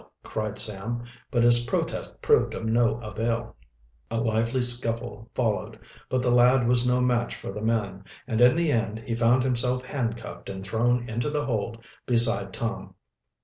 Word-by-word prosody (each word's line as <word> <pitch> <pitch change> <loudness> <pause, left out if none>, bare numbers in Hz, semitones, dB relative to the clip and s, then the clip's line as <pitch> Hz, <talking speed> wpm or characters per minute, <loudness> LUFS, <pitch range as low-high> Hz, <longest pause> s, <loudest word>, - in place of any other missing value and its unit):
cried 110 -1 -4
Sam, 110 +4 0 0.3
but 120 -1 +1
his 120 0 +8
protest - - -3
proved - - +3
of - - -5
no 115 +1 +1
avail. 115 +2 -3 0.5
A 115 - -2
lively 115 +3 0
scuffle 115 -2 -2
followed, 115 -4 -1 0.3
but 130 -1 0
the 125 - +2
lad 125 0 +4
was 125 0 +4
no 125 0 +2
match 120 -1 0
for - - -7
the 105 +2 -7
men, 105 -4 -2 0.2
and 115 -2 -1
in 125 +3 +6
the 170 -2 +1
end 110 -3 -1
he 115 - -5
found 120 +2 +3
himself 125 0 0
handcuffed 120 -3 -5
and 95 0 -6
thrown 120 +3 0
into 120 +5 -2
the 145 0 -2
hold 115 -1 -3 0.2
beside 115 -5 +3
Tom. 115 +3 -5
115 Hz, 165 wpm, -25 LUFS, 110-125 Hz, 0.5 s, his